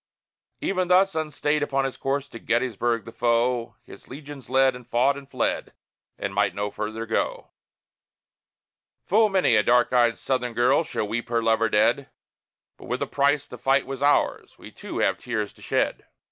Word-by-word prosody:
Even 185 -2 0
thus, 185 +1 +4
unstayed 150 -1 -1
upon 135 -2 0
his 135 - -3
course, 140 +1 -2
to 115 - -10
Gettysburg 120 -2 0
the 115 - -9
foe 120 +1 0
His - - -14
legions 140 0 -10
led, 130 0 +3
and 125 -1 -12
fought, 130 +4 +2
and 140 -1 -11
fled, 130 -4 -2 0.4
and 100 0 -4
might 105 +1 +1
no 105 0 -2
further 110 +2 -4
go. 110 - -2 1.5
Full 215 +3 +4
many 190 -2 +3
a - - +5
dark 120 +3 +3
eyed 120 -2 +3
Southern 125 -3 -2
girl 130 +6 +3
shall 130 -9 -3
weep 115 +2 -3
her 115 -1 0
lover 115 0 +2
dead; 115 +6 +2 0.7
But - - -13
with - - -2
a - - -1
price 140 0 +1
the 125 - -11
fight 135 +3 +2
was 135 0 -6
ours, 145 +1 +1
we - - -12
too - - -8
have - - +1
tears 110 -4 -3
to - - -21
shed! - - -1
125 Hz, 175 wpm, -25 LUFS, 115-140 Hz, 1.5 s, a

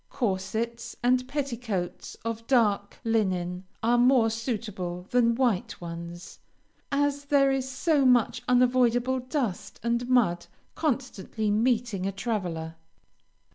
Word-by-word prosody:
Corsets 230 +2 -2
and 255 +1 +3
petticoats 240 -10 -3
of 230 0 -4
dark 210 -6 +2
linen 185 -5 0 0.2
are 240 +1 +3
more 245 -2 +5
suitable 210 -6 -4
than 235 -2 +3
white 235 -7 0
ones, 170 +1 -8 0.5
as 285 0 0
there 280 -1 +4
is 265 -1 -1
so 285 +2 +2
much 250 -3 +3
unavoidable 250 0 +3
dust 245 - -3
and 235 +1 0
mud 195 -9 +2 0.3
constantly 245 - -2
meeting 225 -3 +1
a - - -1
traveler. 180 -6 -3
235 Hz, 110 wpm, -27 LUFS, 195-255 Hz, 0.5 s, more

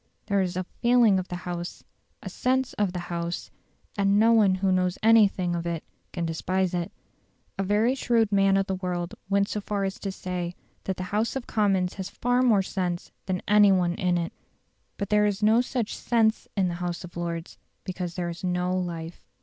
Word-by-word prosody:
There 200 -1 +1
is 180 -1 -2
a 185 - -1
"feeling 235 0 +3
of 185 - -5
the 180 - -5
House," 175 -1 -5 0.4
a - - -6
"sense" 260 0 0
of 205 -3 0
the 180 -1 -5
House, 170 0 -4 0.4
and 200 0 +3
no 225 +1 +5
one 205 -4 +5
who 190 0 +1
knows 180 0 +1
anything 205 -5 +4
of 170 0 -3
it 165 -2 -3 0.3
can 170 -2 -3
despise 185 +3 -1
it. 175 -1 -2 0.7
A - - +2
very 210 +6 +2
shrewd 235 -5 +1
man 195 -1 +4
of 195 - +1
the 190 - -2
world 180 -2 -3 0.2
went 200 0 +2
so 210 - -3
far 200 0 -2
as 195 0 -3
to 195 - -3
say 180 -2 -4 0.3
that 190 - -2
"the 185 - -3
House 220 +4 0
of 265 -2 -3
Commons 195 -4 +1
has 190 0 -6
more 245 -5 +4
sense 180 -2 -3 0.2
than 185 -1 -2
any 205 -1 +6
one 180 -2 +2
in 180 0 0
it". 170 -1 -3 0.6
But 200 - -3
there 210 0 +4
is 205 0 -2
no 220 +3 +5
such 245 -3 -2
"sense" 225 -2 +1
in 190 -2 +3
the 175 - -2
House 175 0 -3
of 175 - -11
Lords, 170 -1 -5 0.2
because 180 -2 -5
there 175 -1 -2
is 170 +1 -8
no 180 0 0
life. 170 -2 -4
190 Hz, 200 wpm, -26 LUFS, 180-210 Hz, 0.7 s, any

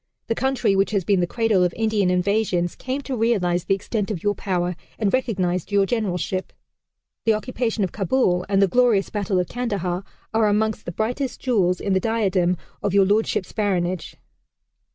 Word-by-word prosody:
The - - 0
country 260 -4 +1
which 195 +1 +2
has 200 -3 0
been 195 +2 +2
the 175 - +1
cradle 220 -3 +2
of 175 -1 0
Indian 215 -4 +1
invasions 180 -1 +1
came 260 +2 -3
to 270 -1 -4
realize 195 -7 +1
the 195 - +2
extent 205 +1 -3
of 195 -7 -4
your 205 0 +2
power 180 -3 -2 0.2
and 205 -3 0
recognized 190 -8 0
your 200 -1 +4
generalship.... 190 -4 -2 0.7
The 225 -1 +4
occupation 225 -1 -2
of 185 - -1
Kabul 190 -3 +1
and 195 0 +4
the - - +4
glorious 230 -1 +2
battle 200 -2 -1
of 180 - 0
Kandahar 195 -6 -2 0.3
are 220 -1 +3
amongst 215 +1 0
the - - -4
brightest 245 +8 -2
jewels 190 -8 +1
in 200 - -1
the 190 - +3
diadem 190 -5 +1 0.2
of 200 -1 -1
Your 195 -1 +6
Lordship's 205 -2 +1
Baronage. 185 -4 -1
200 Hz, 175 wpm, -23 LUFS, 180-225 Hz, 0.7 s, Your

